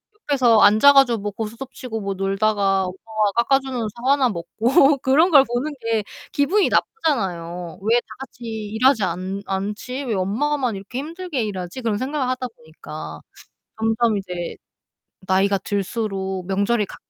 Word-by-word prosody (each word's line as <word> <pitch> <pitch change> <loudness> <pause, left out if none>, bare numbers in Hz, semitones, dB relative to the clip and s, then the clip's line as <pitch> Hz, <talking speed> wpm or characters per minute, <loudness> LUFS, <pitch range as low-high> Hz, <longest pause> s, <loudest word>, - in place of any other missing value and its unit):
옆에서 255 - +3
앉아 220 +9 +7
가지고 255 -5 +5
뭐 205 +1 -4
고스톱 230 +5 -6
치고 225 -4 -6
뭐 195 0 -2
놀다가 195 0 +1
엄마가 210 +2 -2
깎아주는 265 -4 0
사과나 260 +1 +2
먹고 240 - +2
그런 295 +8 +4
걸 275 -3 +8
보는 255 +5 -3
게 225 -2 0 0.3
기분이 365 +9 +2
나쁘잖아요. 180 - -1
'왜 230 +4 +3
다 - - -14
같이 245 -3 -10
일하지 220 +2 +1
않 185 +3 -3
않지? 210 +8 -4
왜 235 - -1
엄마만 245 +6 0
이렇게 200 +7 -6
힘들게 325 -4 -4
일하지?' 190 +3 -5
그런 225 -3 0
생각을 265 +2 -2
하다 255 0 -2
보니까 155 - -9 0.6
점점 225 -1 +1
이제 180 -3 -5 0.7
나이가 195 +1 +3
들수록 195 -2 -3
명절이 200 +3 +1
가 - - -11
220 Hz, 320 characters per minute, -22 LUFS, 195-260 Hz, 0.7 s, 걸